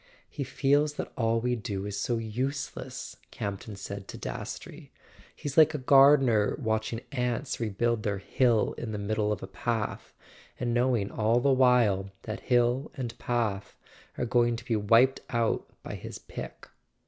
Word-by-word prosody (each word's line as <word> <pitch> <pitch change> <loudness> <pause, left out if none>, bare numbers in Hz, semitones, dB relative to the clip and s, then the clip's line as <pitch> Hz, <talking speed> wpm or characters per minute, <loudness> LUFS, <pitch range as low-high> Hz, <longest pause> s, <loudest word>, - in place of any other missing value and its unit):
"He 145 - -5
feels 145 +3 +2
that - - -5
all 115 -1 +1
we 125 +1 0
do 105 -4 -4
is 105 -1 -4
so 115 +4 -1
useless," 125 +2 -4
Campton 100 0 -5
said 100 0 -7
to - - -8
Dastrey; - - -7 0.4
"he's 145 0 -6
like 155 0 +6
a - - 0
gardener 135 -5 +5
watching 110 -1 -1
ants 125 +2 -1
re¬ 105 -4 -4
build 120 -2 +1
their 105 -2 -1
hill 115 +3 +2
in 110 -2 -4
the - - -2
middle 105 +1 0
of 105 - -3
a - - -5
path, 110 +3 -3 0.5
and 120 -1 -1
knowing 120 -4 +1
all 110 +2 +2
the 135 +2 +3
while 120 -7 +3
that 110 - -5
hill 125 +3 +2
and 120 -3 -4
path 110 -5 -2 0.4
are 125 - 0
going 120 0 +2
to 115 0 -8
be 120 -3 0
wiped 115 +5 +4
out 115 -2 0
by - - -6
his - - -7
pick." - - -9
120 Hz, 165 wpm, -28 LUFS, 105-125 Hz, 0.5 s, like